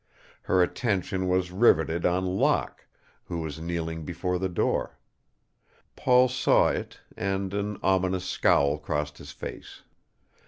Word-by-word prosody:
Her 90 Hz, -1 st, +3 dB
attention 95 Hz, -2 st, -1 dB
was 90 Hz, -1 st, 0 dB
riveted 85 Hz, -5 st, +3 dB
on 90 Hz, +1 st, 0 dB
Locke, 95 Hz, +1 st, 0 dB, 0.4 s
who 85 Hz, -, -5 dB
was 80 Hz, -1 st, -5 dB
kneeling 80 Hz, -1 st, -4 dB
before 90 Hz, +2 st, -2 dB
the 95 Hz, 0 st, -1 dB
door. 85 Hz, -, -1 dB, 1.0 s
Paul 125 Hz, 0 st, +4 dB
saw 125 Hz, -, +3 dB
it -, -, -4 dB, 0.2 s
and 95 Hz, 0 st, -2 dB
an 100 Hz, 0 st, -2 dB
ominous 95 Hz, -1 st, +1 dB
scowl 70 Hz, -4 st, +2 dB
crossed 75 Hz, -1 st, -3 dB
his 70 Hz, -, -10 dB
face. -, -, -9 dB
90 Hz, 125 wpm, -27 LUFS, 80-95 Hz, 1.0 s, Paul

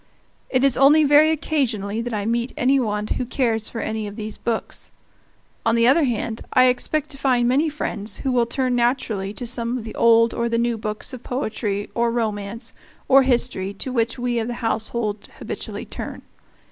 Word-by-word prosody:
It 255 Hz, 0 st, +1 dB
is 275 Hz, -2 st, +3 dB
only 295 Hz, +3 st, +6 dB
very 295 Hz, +2 st, +6 dB
occasionally 235 Hz, -9 st, -1 dB
that 245 Hz, +1 st, -4 dB
I 210 Hz, -2 st, -2 dB
meet 235 Hz, +2 st, -1 dB
any 270 Hz, +2 st, +3 dB
one 210 Hz, -4 st, -1 dB
who 235 Hz, -, -2 dB
cares 230 Hz, -3 st, -1 dB
for 230 Hz, -, -5 dB
any 220 Hz, -1 st, -3 dB
of 205 Hz, -, -8 dB
these 215 Hz, -1 st, -4 dB
books. 230 Hz, -2 st, -3 dB, 0.7 s
On 225 Hz, 0 st, +2 dB
the 230 Hz, 0 st, +3 dB
other 280 Hz, +5 st, +5 dB
hand, 230 Hz, -2 st, -2 dB
I 255 Hz, -, +6 dB
expect 300 Hz, +4 st, 0 dB
to 275 Hz, -, -7 dB
find 250 Hz, -3 st, +2 dB
many 285 Hz, +6 st, +2 dB
friends 215 Hz, -8 st, -3 dB
who 265 Hz, -, -2 dB
will 240 Hz, -2 st, +2 dB
turn 255 Hz, +1 st, 0 dB
naturally 235 Hz, -5 st, 0 dB
to 245 Hz, -, -5 dB
some 235 Hz, 0 st, -1 dB
of 240 Hz, -, -6 dB
the 220 Hz, -, -7 dB
old 230 Hz, 0 st, +4 dB
or 235 Hz, 0 st, -1 dB
the 230 Hz, -, 0 dB
new 235 Hz, 0 st, +1 dB
books 215 Hz, +4 st, -4 dB
of 255 Hz, -, -7 dB
poetry 220 Hz, -6 st, -3 dB
or 235 Hz, 0 st, +1 dB
romance 225 Hz, 0 st, -3 dB, 0.3 s
or 270 Hz, +1 st, +7 dB
history 240 Hz, -7 st, +1 dB
to 255 Hz, +6 st, -4 dB
which 230 Hz, +1 st, 0 dB
we 245 Hz, -1 st, -1 dB
of 225 Hz, -, -2 dB
the 240 Hz, -, -3 dB
household 220 Hz, -2 st, -2 dB
habitually -, -, -6 dB
turn. -, -, -7 dB
235 Hz, 195 wpm, -22 LUFS, 220-255 Hz, 0.7 s, or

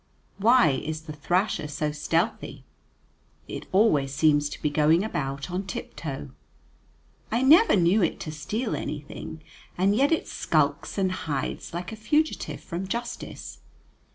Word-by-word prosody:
Why 235 Hz, 0 st, +6 dB
is 155 Hz, 0 st, -4 dB
the 155 Hz, -1 st, -8 dB
thrasher 175 Hz, +2 st, 0 dB
so 150 Hz, +1 st, -2 dB
stealthy? 165 Hz, +7 st, -1 dB, 0.8 s
It -, -, -7 dB
always 170 Hz, -10 st, +3 dB
seems 145 Hz, +1 st, +3 dB
to -, -, -8 dB
be 150 Hz, -, -1 dB
going 155 Hz, +4 st, +4 dB
about 140 Hz, -6 st, -3 dB
on 190 Hz, +2 st, -3 dB
tip -, -, -6 dB
toe. 135 Hz, -, -6 dB, 1.0 s
I 235 Hz, +4 st, +1 dB
never 325 Hz, +12 st, +7 dB
knew 185 Hz, +3 st, +4 dB
it 170 Hz, -, 0 dB
to 155 Hz, -, -5 dB
steal 210 Hz, -, -3 dB
anything, 155 Hz, +1 st, -6 dB, 0.3 s
and 195 Hz, +3 st, +3 dB
yet 275 Hz, +6 st, +3 dB
it 325 Hz, -, +1 dB
skulks 145 Hz, +1 st, 0 dB
and 190 Hz, -2 st, +1 dB
hides 150 Hz, -6 st, -3 dB
like 175 Hz, +3 st, -5 dB
a -, -, -5 dB
fugitive 295 Hz, +9 st, 0 dB
from 180 Hz, +3 st, -5 dB
justice. 235 Hz, +4 st, -5 dB
170 Hz, 145 wpm, -26 LUFS, 150-215 Hz, 1.0 s, never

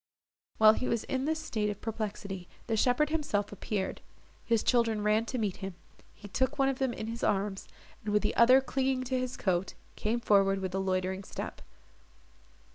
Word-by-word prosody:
While 215 Hz, 0 st, +8 dB
he 255 Hz, -, -2 dB
was 230 Hz, -, 0 dB
in 265 Hz, 0 st, -2 dB
this 315 Hz, +1 st, 0 dB
state 215 Hz, -9 st, -1 dB
of 205 Hz, -, -4 dB
perplexity, 205 Hz, -4 st, -4 dB, 0.2 s
the 225 Hz, -, 0 dB
shepherd 255 Hz, +7 st, +2 dB
himself 285 Hz, -11 st, -1 dB
appeared: 205 Hz, -1 st, -3 dB, 0.4 s
his 230 Hz, -2 st, +1 dB
children 230 Hz, -4 st, +2 dB
ran 215 Hz, +2 st, +3 dB
to 255 Hz, -, -3 dB
meet 210 Hz, -5 st, -1 dB
him; 195 Hz, -2 st, -6 dB, 0.4 s
he 205 Hz, -, -11 dB
took 260 Hz, +6 st, 0 dB
one 270 Hz, 0 st, +3 dB
of 270 Hz, -, -2 dB
them 265 Hz, -2 st, +1 dB
in 220 Hz, -, -5 dB
his 230 Hz, +1 st, -5 dB
arms, 195 Hz, -1 st, 0 dB, 0.4 s
and, 210 Hz, -, -2 dB
with 210 Hz, 0 st, +2 dB
the -, -, 0 dB
other 255 Hz, +3 st, +7 dB
clinging 265 Hz, -1 st, 0 dB
to 255 Hz, 0 st, -1 dB
his 255 Hz, 0 st, -3 dB
coat, 185 Hz, -1 st, 0 dB, 0.2 s
came 225 Hz, +3 st, -1 dB
forward 195 Hz, -4 st, +4 dB
with 190 Hz, -1 st, -4 dB
a 190 Hz, -, 0 dB
loitering 190 Hz, 0 st, -1 dB
step. -, -, -6 dB
215 Hz, 190 wpm, -30 LUFS, 200-255 Hz, 0.4 s, While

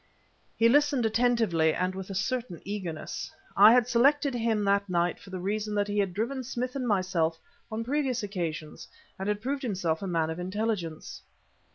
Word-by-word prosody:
He 230 Hz, -, +5 dB
listened 285 Hz, -1 st, +3 dB
attentively 220 Hz, -8 st, +2 dB
and 185 Hz, +1 st, 0 dB
with 190 Hz, 0 st, -7 dB
a 195 Hz, -, -5 dB
certain 230 Hz, -4 st, -2 dB
eagerness. 185 Hz, -6 st, -5 dB, 0.2 s
I 205 Hz, +3 st, +9 dB
had 245 Hz, -1 st, +4 dB
selected 275 Hz, +4 st, +3 dB
him 225 Hz, -3 st, 0 dB
that 200 Hz, 0 st, +2 dB
night 175 Hz, 0 st, 0 dB
for -, -, -14 dB
the 185 Hz, -1 st, -5 dB
reason 210 Hz, +3 st, -2 dB
that 205 Hz, 0 st, +1 dB
he 205 Hz, 0 st, -1 dB
had 195 Hz, -2 st, +1 dB
driven 235 Hz, +8 st, -2 dB
Smith 250 Hz, +1 st, -4 dB
and 255 Hz, -3 st, -2 dB
myself 185 Hz, -5 st, +1 dB, 0.3 s
on 220 Hz, +1 st, -2 dB
previous 260 Hz, -2 st, -1 dB
occasions 170 Hz, -6 st, -4 dB, 0.3 s
and 190 Hz, +2 st, -2 dB
had 210 Hz, 0 st, -1 dB
proved 270 Hz, +3 st, -2 dB
himself 180 Hz, -9 st, -1 dB
a 195 Hz, -, -3 dB
man 165 Hz, -3 st, 0 dB
of 160 Hz, -, -5 dB
intelligence. 185 Hz, -3 st, -3 dB
205 Hz, 180 wpm, -28 LUFS, 180-240 Hz, 0.3 s, I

